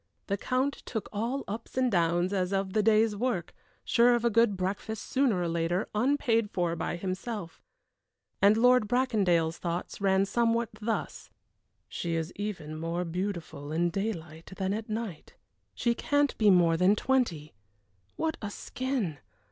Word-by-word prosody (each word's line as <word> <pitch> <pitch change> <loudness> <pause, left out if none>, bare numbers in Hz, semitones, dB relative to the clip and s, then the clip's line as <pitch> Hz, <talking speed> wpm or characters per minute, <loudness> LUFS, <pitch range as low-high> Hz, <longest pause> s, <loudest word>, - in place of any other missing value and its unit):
The 200 - 0
Count 255 +7 -1
took 220 -3 -3
all 235 +6 -2
ups 225 +5 -7
and 255 -1 +2
downs 175 +1 +2
as 185 -1 0
of 195 -1 -1
the 215 - +3
day's 215 0 +3
work, 205 -6 -2 0.3
sure 240 +1 +5
of 240 0 -1
a 235 - +3
good 225 -2 +3
breakfast, 200 +4 -3
sooner 260 -8 +2
or 175 - 0
later, 170 +3 -1
unpaid 230 -2 +2
for 175 -3 -1
by 170 - -2
himself. 185 0 -5 0.8
And 205 +2 +6
Lord 250 -1 +5
Bracondale's 200 -10 +1
thoughts 175 +3 -4
ran 195 0 +3
somewhat 230 +1 +1
thus: 225 +1 -3 0.6
"She 170 -1 -3
is 165 +1 -3
even 175 -7 -5
more 170 +2 -2
beautiful 170 -5 -4
in 170 +2 +1
daylight 170 -4 -4
than 190 0 -1
at 220 +1 -4
night. 215 -6 -5 0.4
She 235 - +1
can't 285 +3 +1
be 215 -2 +5
more 170 -3 +5
than 185 +4 +4
twenty 210 - 0 0.6
what 320 -1 -1
a 210 - -3
skin! 235 - -3
200 Hz, 155 wpm, -29 LUFS, 175-230 Hz, 0.8 s, And